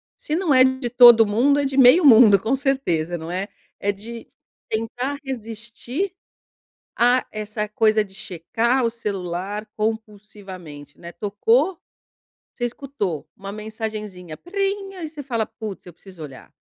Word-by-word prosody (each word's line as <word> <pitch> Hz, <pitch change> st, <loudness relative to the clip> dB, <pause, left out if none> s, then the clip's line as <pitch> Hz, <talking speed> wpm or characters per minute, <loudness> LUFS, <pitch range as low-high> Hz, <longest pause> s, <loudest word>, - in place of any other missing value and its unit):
Se 300 Hz, -, -4 dB
não 340 Hz, -4 st, +1 dB
é 255 Hz, 0 st, +7 dB
de 260 Hz, -1 st, -1 dB
todo 240 Hz, -2 st, +8 dB
mundo, 250 Hz, +8 st, +2 dB
é 285 Hz, -, 0 dB
de 270 Hz, 0 st, -3 dB
meio 265 Hz, +7 st, +7 dB
mundo, 220 Hz, -6 st, +8 dB
com 225 Hz, +6 st, 0 dB
certeza, 220 Hz, -, -1 dB
não 165 Hz, +1 st, -7 dB
é. 185 Hz, +2 st, -3 dB, 0.3 s
É 205 Hz, -, 0 dB
de 225 Hz, +3 st, -10 dB, 0.4 s
tentar 245 Hz, +5 st, -3 dB
resistir 240 Hz, -, -5 dB, 0.8 s
a 245 Hz, +2 st, +3 dB
essa 215 Hz, 0 st, -4 dB
coisa 215 Hz, 0 st, +2 dB
de 195 Hz, -2 st, -17 dB
checar 225 Hz, +6 st, -1 dB
o -, -, +2 dB
celular 200 Hz, -2 st, -4 dB
compulsivamente, 200 Hz, -9 st, -6 dB
né. 170 Hz, 0 st, -9 dB
Tocou, 230 Hz, -, +1 dB, 0.7 s
você 240 Hz, -, -3 dB
escutou 235 Hz, -, -4 dB
uma 195 Hz, 0 st, -8 dB
mensagenzinha, 215 Hz, -5 st, -6 dB
prim, 390 Hz, +1 st, -3 dB
aí 345 Hz, -4 st, -6 dB
você 300 Hz, -1 st, -9 dB
fala: 235 Hz, -5 st, -2 dB
"Putz, 215 Hz, -5 st, -8 dB
eu 180 Hz, -, -12 dB
preciso 185 Hz, -1 st, -13 dB
olhar." 135 Hz, -3 st, -12 dB
220 Hz, 145 wpm, -22 LUFS, 200-260 Hz, 0.8 s, todo